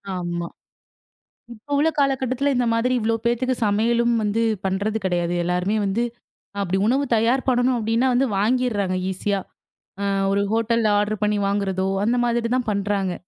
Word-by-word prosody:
ஆமா. 175 -1 -3 1.1
இப்ப 235 +6 -8
உள்ள 305 +3 +3
காலக்கட்டத்தில 270 0 +1
இந்த 245 0 +1
மாதிரி, 235 +3 +1
இவ்ளோ 225 0 0
பேத்துக்கு 250 +2 +1
சமையலும் 235 +3 +2
வந்து, 210 +2 0 0.2
பண்றது 200 +3 -1
கெடையாது. 175 -2 0
எல்லாருமே 180 +4 0
வந்து, 200 +5 0 0.6
அப்டி 190 -1 0
உணவு 270 +4 +2
தயார் 235 +4 +1
பண்ணணும் 250 0 +2
அப்டின்னா 230 +3 +1
வந்து, 260 +2 +2
வாங்கிர்றாங்க 210 -4 0
ஈஸியா. 200 +1 -1 0.6
அ, - - -1 0.3
ஒரு 200 +1 +2
ஹோட்டல்ல 230 0 +1
ஆர்டர் 210 0 -2
பண்ணி 210 0 +1
வாங்குறதோ, 195 -2 -1 0.2
அந்த 240 +3 +1
மாதிரி 235 -1 0
தான் 250 -3 -1
பண்றாங்க. 200 -2 -1
220 Hz, 145 wpm, -22 LUFS, 200-245 Hz, 1.1 s, உள்ள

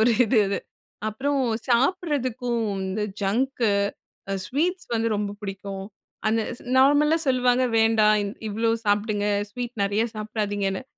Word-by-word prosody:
ஒரு 240 - +4
இது 225 +1 +2
அது. 200 - -1 0.5
அப்புறம் 275 +7 -1 0.3
சாப்பிடறதுக்கும் 255 - +1
வந்து 190 +2 -2 0.2
ஜங்க், 240 +7 0 0.7
அ - - 0
ஸ்வீட்ஸ் 355 +7 -1
வந்து 230 0 +1
ரொம்ப 205 0 -2
பிடிக்கும். 195 -1 -5 0.4
அந்த 225 +1 +2 0.4
நார்மலா 290 +4 +5
சொல்லுவாங்க. 250 0 +3
"வேண்டாம். 220 -1 +4 0.3
இவ்வளோ 225 +2 0 0.2
சாப்பிடுங்க." 205 0 +1 0.2
ஸ்வீட் 245 +2 -5
நெறைய 200 +2 +1
சாப்பிடாதீங்கன்னு. 205 -2 -2
225 Hz, 115 wpm, -25 LUFS, 205-255 Hz, 0.7 s, நார்மலா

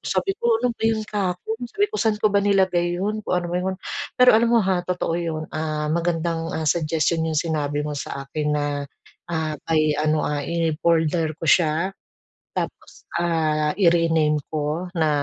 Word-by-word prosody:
sabi 390 - 0
ko, 235 -1 +3
"ano 245 +1 0
ba 225 - -12
'yun 220 -1 +1
kahapon," 205 +1 -2
sabi 405 +11 +1
ko, 430 - -2
"Saan 220 -2 +2
ko 215 -1 +2
ba 200 - +4
nilagay 185 -3 +2
'yun 210 +3 -1
kung 195 - -1
ano 175 -1 -1
ba - - +1
''yun," 190 +1 -2 0.4
pero 250 0 +7
alam 230 +1 +4
mo, 235 - +5
ha, 185 -2 +1
totoo 180 -2 -2
yun, 165 -2 -3
ah, 155 -1 -2
magandang, 165 -1 -1
ah, 160 - -2
suggestion 160 +1 +1
'yung 155 - -1
sinabi 150 -2 -1
mo 150 - -3
sa 140 -1 -5
akin 150 +2 -3
na, 145 0 0 0.7
ah, 160 -2 -1
by 160 -1 +3 0.2
ano, 155 0 +1
ah, 150 -1 -1
in 165 +1 0
folder 165 -1 +2
ko - - -6
siya, 170 +2 +3 0.6
tapos, - - -5 0.2
ah, 155 -3 +1
i-rename 165 -4 +3
ko 155 +3 -2
na 160 -2 +2
170 Hz, 180 wpm, -23 LUFS, 155-190 Hz, 0.7 s, pero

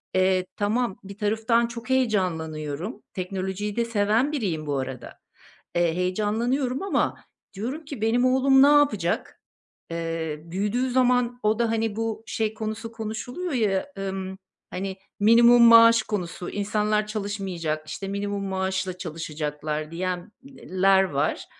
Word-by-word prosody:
Eee, 185 0 +3
tamam, 215 +1 0
bir 200 +1 -10
taraftan 225 +2 +1
çok 235 +2 -9
heyecanlanıyorum. 175 - -1
Teknolojiyi 190 +2 -3
de 235 - +1
seven 225 +5 +1
biriyim 180 - -2
bu 140 -1 0
arada. 130 -1 -6 0.6
Eee, 170 -1 +2
heyecanlanıyorum 230 - 0
ama 395 - 0 0.4
diyorum 255 +11 -5
ki, 280 -6 -7
"Benim 235 +3 +2
oğlum 265 +1 +5
ne 280 - +7
yapacak?" 285 -12 +2 0.5
Eee, 165 -2 -3
büyüdüğü 210 +9 -1
zaman 245 -1 +2
o 215 +2 +2
da, 230 -1 +2
hani, 225 -2 -1
bu 225 0 -3
şey 220 -1 -1
konusu 220 +1 -5
konuşuluyor 235 +10 -5
ya, 220 +3 0
ımm, 190 -1 -4 0.3
hani, 190 0 -4 0.2
minimum 235 +3 +7
maaş 230 0 +8
konusu, 180 -4 -4
insanlar 210 +1 0
çalışmayacak, 190 -7 -3
işte, 195 - -5
minimum 200 0 -3
maaşla 190 -1 -2
çalışacaklar 155 -2 -4
diyen 180 +3 -3
eee, 190 -9 -8
ler 195 0 +6
var. 145 -6 -1
205 Hz, 130 wpm, -25 LUFS, 185-235 Hz, 0.6 s, maaş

